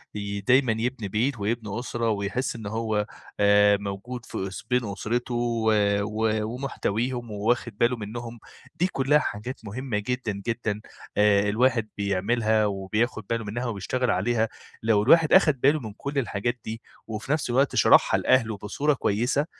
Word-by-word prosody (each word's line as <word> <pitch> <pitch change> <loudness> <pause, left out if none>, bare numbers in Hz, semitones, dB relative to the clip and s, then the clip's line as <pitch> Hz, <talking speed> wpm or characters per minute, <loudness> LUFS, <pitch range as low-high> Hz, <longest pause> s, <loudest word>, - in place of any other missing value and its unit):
ي 100 -1 -4
ديمًا 125 +4 +4
يبني 120 -3 -2
بيت 115 +5 0
ويبني 110 +1 -2
أسرة 120 -2 -2
ويحس 105 +5 -1
إن 115 -2 -8
هو 110 -1 -1 0.3
آآ 105 0 +5
موجود 100 +5 -6
في 95 - -4
اس 95 - -8
بين 125 -1 +2
أسرته، 115 +5 -3
و 115 -2 +1 0.3
و 110 +1 0
ومحتويهم 120 0 -3
وواخد 110 +1 -1
باله 120 +3 +2
منُّهم، 115 +2 -7 0.4
دي 170 +2 +1
كلّها 145 -3 +2
حاجات 120 0 -4
مهمّة 120 +2 -3
جدًا 110 -2 -3
جدًا، 110 -3 -2 0.4
آآ 105 -1 +4
الواحد 115 0 +2
بيعملها، 105 +2 +1
وبياخد 105 +2 -1
باله 115 0 -1
منها 115 +4 -4
وبيشتغل 120 +3 -1
عليها، 110 +3 +1 0.3
لو 110 -2 +3
الواحد 160 +6 +5
أخد 155 -9 +5
باله 145 +3 +4
من 110 -6 -7
كلّ 140 +6 -6
الحاجات 120 +1 -2
دي 110 +1 -5 0.3
وفي 110 +4 -5
نفْس 150 -4 0
الوقت 135 +3 +2
شرحها - - +5
لأهله 115 -4 +2
بصورة 140 +9 0
كويسة، 125 +4 0
115 Hz, 155 wpm, -25 LUFS, 105-125 Hz, 0.4 s, آآ